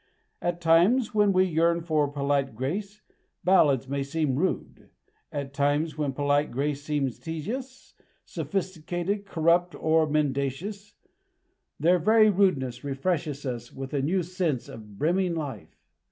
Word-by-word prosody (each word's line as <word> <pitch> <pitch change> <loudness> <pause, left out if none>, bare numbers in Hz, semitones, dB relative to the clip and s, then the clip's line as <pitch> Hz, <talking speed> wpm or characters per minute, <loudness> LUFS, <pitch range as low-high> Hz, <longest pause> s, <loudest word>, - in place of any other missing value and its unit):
At 175 0 -2
times 180 +10 +4
when 210 -1 +4
we 185 0 +4
yearn 170 0 +2
for 155 -3 +1
polite 140 -3 -1
grace, 195 - -4 0.4
ballads 150 -8 +4
may 140 +1 -2
seem 140 -1 -1
rude; 180 +7 -2 0.4
at 140 -3 -5
times 145 +2 +1
when 150 -2 -1
polite 145 +2 +1
grace 140 +3 -2
seems 145 -4 -2
tedious, 235 - -6 0.3
sophisticated, 185 +1 -3
corrupt, 170 0 +2
or 160 0 +2
mendacious, 150 +8 -2 0.8
their 175 +4 +4
very 215 +4 +5
rudeness 140 -11 +1
refreshes 145 +1 -2
us 120 -2 -5
with 135 +2 -7
a 140 - +1
new 175 +6 +1
sense 170 -7 -2
of 105 -3 -11
brimming 175 - +1
life. 140 - -6
155 Hz, 130 wpm, -27 LUFS, 140-185 Hz, 0.8 s, very